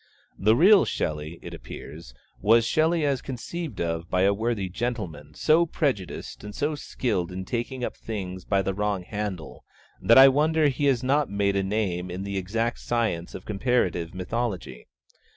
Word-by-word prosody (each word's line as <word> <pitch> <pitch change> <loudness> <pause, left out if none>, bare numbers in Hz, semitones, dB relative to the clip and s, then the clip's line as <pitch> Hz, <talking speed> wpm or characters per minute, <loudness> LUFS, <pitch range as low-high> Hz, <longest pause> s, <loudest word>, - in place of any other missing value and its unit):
The 110 +3 +4
real 190 - +7
Shelley, 75 +2 -3
it - - -8
appears, - - -10 0.3
was 115 +2 +5
Shelley 160 +4 +2
as 140 -2 0
conceived 145 +6 -6
of 85 0 -2
by 90 0 +2
a 100 +1 +4
worthy 110 -2 -1
gentleman 90 -9 -4
so 165 +2 +3
prejudiced 130 - -3
and 105 0 -8
so 150 +2 0
skilled 105 - -2
in 95 +1 -5
taking 125 +4 -3
up - - -3
things 95 -4 -6
by 100 -1 +1
the 95 - -1
wrong 100 -2 -1
handle 100 -5 -5 0.4
that 115 - +6
I 135 +1 +11
wonder 150 +2 +3
he 140 +2 -1
has 135 -3 +2
not 140 +2 +2
made 100 0 0
a 100 - +2
name 95 -3 -1
in 90 +2 -5
the 100 0 -3
exact 115 +5 -2
science 110 -8 -1
of - - -8
Comparative 100 -6 0
Mythology. 95 - -4
105 Hz, 170 wpm, -26 LUFS, 90-130 Hz, 0.4 s, I